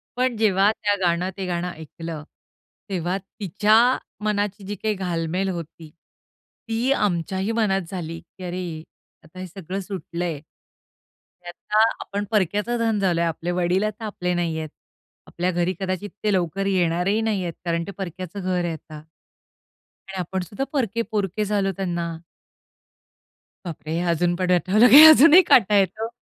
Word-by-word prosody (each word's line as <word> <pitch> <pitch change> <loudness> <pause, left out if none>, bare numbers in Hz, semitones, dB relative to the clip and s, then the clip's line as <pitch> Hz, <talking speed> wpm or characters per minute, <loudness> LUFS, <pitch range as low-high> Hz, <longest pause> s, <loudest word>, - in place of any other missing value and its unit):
पण 250 0 0
जेव्हा 205 -2 +3
त्या 205 -2 0
गाणं 175 +1 +1
ते 195 - -3
गाणं 175 0 -2
ऐकलं, 160 -1 -8 0.7
तेव्हा 180 -1 -1
तिच्या 200 +1 -1 0.5
मनाची 205 -1 -1
जी 205 - -4
काही 215 +2 -1
घालमेल 180 0 -2
होती. 165 -2 -7 0.8
ती 230 +4 0
आमच्याही 190 -3 0
मनात 210 -4 +1
झाली, 165 -3 -5
की 185 - -15
अरे, 175 -2 -4 0.4
आता 160 +4 -14
हे 185 - -6
सगळं 185 +1 -6
सुटलं 180 -2 -5
आहे. 160 -4 -3 1.1
आता 210 +5 +1 0.2
आपण 200 +1 -4
परक्याचं 210 +4 0
धन 225 -2 +1
झालो 180 -4 +1
आहे. 170 - +2
आपले 165 +2 -4
वडील 180 +2 +1
आता 215 +1 -3
आपले 180 -4 -2
नाही 170 -2 -1
आहेत. 155 -1 -5 0.6
आपल्या 180 +1 -2
घरी 175 +1 0
कदाचित 190 +1 -3
ते 210 -1 +2
लवकर 185 +1 -1
येणारही 185 +2 +1
नाही 215 -4 -1
आहेत, 170 -1 -4
कारण 170 -1 0
ते - - -5
परक्याच 185 -1 -6
घर 185 -2 -1
आहे 170 -1 -2
आता. 155 -1 -10 1.1
आणि 195 - -6
आपण 185 +1 -3
सुद्धा 200 +8 -4
परके 230 -5 0
पोरके 210 0 -1
झालो 200 -1 0
त्यांना. 170 -3 -3 1.5
बापरे! 160 -2 -6
हे - - -1
अजून 175 +1 +1
पण 180 0 -1
आठवलं, 195 +7 +4
की 295 +5 +11
अजूनही 315 +3 +9
काटा 210 -4 +5
येतो. 200 +4 0
185 Hz, 155 wpm, -23 LUFS, 175-205 Hz, 1.5 s, की